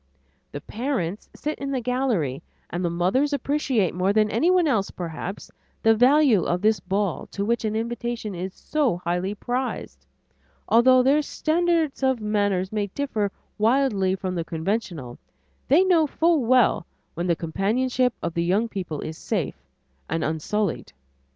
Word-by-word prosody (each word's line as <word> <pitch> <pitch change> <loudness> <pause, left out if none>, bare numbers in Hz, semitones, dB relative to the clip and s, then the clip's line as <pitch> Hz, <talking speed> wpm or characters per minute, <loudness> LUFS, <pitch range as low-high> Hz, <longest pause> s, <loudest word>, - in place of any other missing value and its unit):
The 145 - -6
parents 220 - -3
sit 300 +1 -4
in 275 - -4
the 270 -2 -1
gallery, 240 - -1 0.3
and 175 +1 -2
the 175 - +1
mothers 190 - +1
appreciate 275 - 0
more 185 +2 +1
than 215 0 +3
anyone 345 +8 +3
else 215 -9 +1
perhaps, 175 +3 -6 0.3
the 225 - +6
value 255 -2 +5
of 180 +2 -1
this 215 0 +3
ball 200 -2 -2
to 200 - -4
which 235 +2 0
an 215 0 -1
invitation 235 -1 -3
is 185 +2 -4
so 285 - 0
highly 180 +3 -2
prized; 250 +4 -4 0.6
although 255 +2 +5
their 280 +4 +4
standards 325 -1 0
of 265 -2 +2
manners 205 -3 0
may 210 -1 -1
differ 215 -3 -2 0.3
widely 215 -5 +2
from 185 -1 -4
the 170 -2 -2
conventional, 165 - -3 0.5
they 310 +8 +5
know 345 -5 +4
full 320 -2 +2
well 240 -7 +3 0.3
when 170 +2 -3
the 170 - +2
companionship 235 +10 0
of 170 - -2
the 170 - 0
young 195 +7 +1
people 180 -8 -5
is 160 0 -6
safe - - -3 0.5
and 160 +1 -1
unsullied. 160 - -2
215 Hz, 150 wpm, -24 LUFS, 180-260 Hz, 0.6 s, the